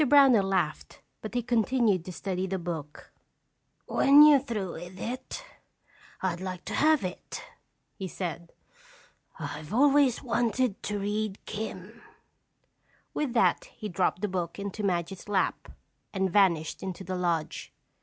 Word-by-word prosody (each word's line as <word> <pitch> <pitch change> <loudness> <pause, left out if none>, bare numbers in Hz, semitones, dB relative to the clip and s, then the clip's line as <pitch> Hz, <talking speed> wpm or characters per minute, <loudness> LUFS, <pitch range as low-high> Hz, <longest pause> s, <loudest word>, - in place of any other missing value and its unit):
Brownell 270 -8 +6
laughed 180 -6 -1 0.2
but 215 +2 -7
he 245 - +1
continued 230 -5 +2
to 185 - -6
study 185 +1 -3
the 190 +1 -2
book. 160 -4 -6 0.7
"When 285 +2 +7
you're 300 -2 +8
through 215 -9 -4
with 175 +2 -9
it, 255 - -5 0.8
I'd 180 -2 -1
like 185 -1 -5
to - - -5
have 310 -3 +4
it," 185 - -6 0.5
he 190 - -6
said. 170 -1 -5 0.9
"I've 150 +3 -6
always 275 +1 +4
wanted 235 -2 0
to 210 0 -3
read 205 0 -2
'Kim'." 210 +1 -6 1.1
With 285 -5 -1
that 240 - +3
he 215 -3 -8
dropped 180 +1 0
the - - +2
book 180 -3 -3
into 200 +1 -5
Madge's 185 0 -2
lap 195 -2 0 0.4
and 190 -2 0
vanished 170 -6 +3
into 190 0 -5
the 185 -1 -4
lodge. 170 -3 -2
195 Hz, 135 wpm, -28 LUFS, 180-235 Hz, 1.1 s, you're